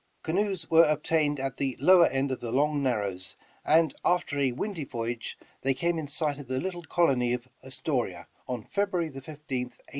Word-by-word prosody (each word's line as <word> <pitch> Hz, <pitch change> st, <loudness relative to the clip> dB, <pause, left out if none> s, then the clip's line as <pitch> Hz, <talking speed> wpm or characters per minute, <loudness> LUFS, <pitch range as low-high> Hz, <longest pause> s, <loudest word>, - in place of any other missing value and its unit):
Canoes 190 Hz, 0 st, -1 dB
were 165 Hz, +1 st, +7 dB
obtained 150 Hz, -1 st, +1 dB
at 135 Hz, -1 st, -3 dB
the 135 Hz, -3 st, -1 dB
lowed 175 Hz, +2 st, +6 dB
end 135 Hz, +1 st, 0 dB
of 130 Hz, -, -2 dB
the 115 Hz, -, -5 dB
Long 145 Hz, +3 st, +2 dB
Narrows, 100 Hz, -8 st, -2 dB, 0.3 s
and 160 Hz, -1 st, +4 dB
after 170 Hz, -5 st, +1 dB
a 135 Hz, -2 st, +2 dB
windy 175 Hz, -, -3 dB
voyage 120 Hz, -2 st, -4 dB, 0.2 s
they 135 Hz, 0 st, +1 dB
came 170 Hz, +3 st, 0 dB
in 155 Hz, -, -4 dB
sight 145 Hz, 0 st, -2 dB
of 140 Hz, -, -9 dB
the 130 Hz, +1 st, -1 dB
little 180 Hz, 0 st, -4 dB
colony 130 Hz, -9 st, +2 dB
of 125 Hz, 0 st, -4 dB, 0.2 s
Astoria 125 Hz, -, -2 dB, 0.2 s
on 125 Hz, -3 st, -3 dB
February 195 Hz, -5 st, -1 dB
15th, 135 Hz, -1 st, -10 dB
1812. 135 Hz, -5 st, -5 dB
140 Hz, 180 wpm, -28 LUFS, 125-165 Hz, 0.3 s, were